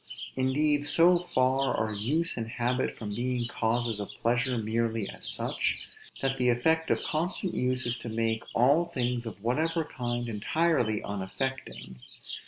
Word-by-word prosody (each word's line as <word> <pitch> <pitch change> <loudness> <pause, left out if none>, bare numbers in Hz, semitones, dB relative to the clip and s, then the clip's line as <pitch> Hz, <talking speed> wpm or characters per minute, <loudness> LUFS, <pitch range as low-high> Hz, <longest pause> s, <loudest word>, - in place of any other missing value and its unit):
Indeed 145 +3 +2
so 170 +3 +6
far 130 -5 +1
are 110 0 -1
use 145 +12 0
and 115 -2 -3
habit 125 +2 -1
from 105 -2 -5
being 120 +1 -1
causes 115 -1 0
of 100 - -4
pleasure 120 +2 +2
merely 115 -1 0
as - - -5
such, - - -1 0.4
that 135 0 +1
the 125 -1 +3
effect 160 +7 +2
of - - +1
constant 175 +4 -1
use 130 +1 0
is 120 0 0
to 120 - -6
make 115 0 0
all 140 +8 +4
things 125 -7 -2
of 110 - -7
whatever 160 +7 +1
kind 120 -3 -3
entirely 115 +1 +1
unaffecting. 95 - -4
125 Hz, 150 wpm, -29 LUFS, 115-145 Hz, 0.4 s, so